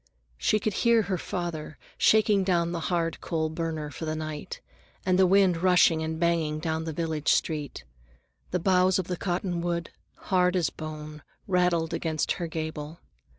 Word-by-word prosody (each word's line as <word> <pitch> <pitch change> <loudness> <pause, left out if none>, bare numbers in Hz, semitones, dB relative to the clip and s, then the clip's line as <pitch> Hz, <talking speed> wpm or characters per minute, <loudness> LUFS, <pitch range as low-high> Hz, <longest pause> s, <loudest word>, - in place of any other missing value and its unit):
She 215 - +2
could 210 0 -1
hear 235 -2 +4
her 190 -1 -1
father 165 -4 -4 0.2
shaking 210 -2 +4
down 170 -3 +1
the 170 - -2
hard 165 -2 -1
coal 160 -1 -1
burner 160 -2 -4
for 160 - -6
the 155 0 -2
night, 155 -1 -6 0.5
and 185 0 +2
the 190 - +6
wind 190 -2 +4
rushing 180 -2 +4
and 160 0 -3
banging 165 -3 +1
down 160 +1 -2
the 160 - -3
village 160 -1 -1
street. 150 - -1 0.7
The 180 - 0
boughs 185 +1 +3
of 190 - -1
the 180 - -3
cottonwood, 175 -2 -2 0.2
hard 180 -1 +1
as 175 -3 +1
bone, 155 -1 -8 0.3
rattled 180 -3 +1
against 160 -2 -1
her 175 -3 -2
gable. 160 0 -5
170 Hz, 160 wpm, -27 LUFS, 160-180 Hz, 0.7 s, the